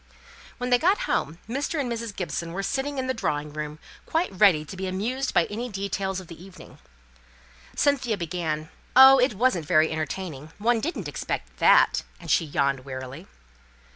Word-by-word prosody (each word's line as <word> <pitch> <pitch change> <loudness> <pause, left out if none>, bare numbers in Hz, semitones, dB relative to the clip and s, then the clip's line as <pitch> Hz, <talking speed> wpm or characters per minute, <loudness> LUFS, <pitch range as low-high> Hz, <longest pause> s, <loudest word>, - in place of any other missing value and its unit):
When 250 0 -3
they 245 - +5
got 385 - +2
home 160 - -1
Mr. 280 +6 -2
and 275 - -1
Mrs. 230 -3 -4
Gibson 170 -2 -4
were 195 +2 -3
sitting 275 +5 -2
in 260 - -1
the 260 - 0
drawing 150 -10 -2
room, 150 0 -5 0.3
quite 330 +3 0
ready 180 -6 +4
to 150 - -9
be 190 0 -4
amused 235 +9 -2
by 170 - +3
any 235 +4 -5
details 195 -1 -3
of 185 - -10
the 170 0 -12
evening. 190 -1 -14 1.0
Cynthia 260 -6 +1
began, 160 -3 -3 0.3
"Oh! 265 +1 +9
it 250 -3 +2
wasn't 190 - +1
very 160 -2 +4
entertaining. 160 -1 -5
One 230 +2 +2
didn't 240 - -3
expect 60 - -5
that," - - +5 0.2
and - - -5
she 165 - +3
yawned 140 -2 0
wearily. 130 +5 -8
190 Hz, 170 wpm, -25 LUFS, 155-250 Hz, 1.0 s, Oh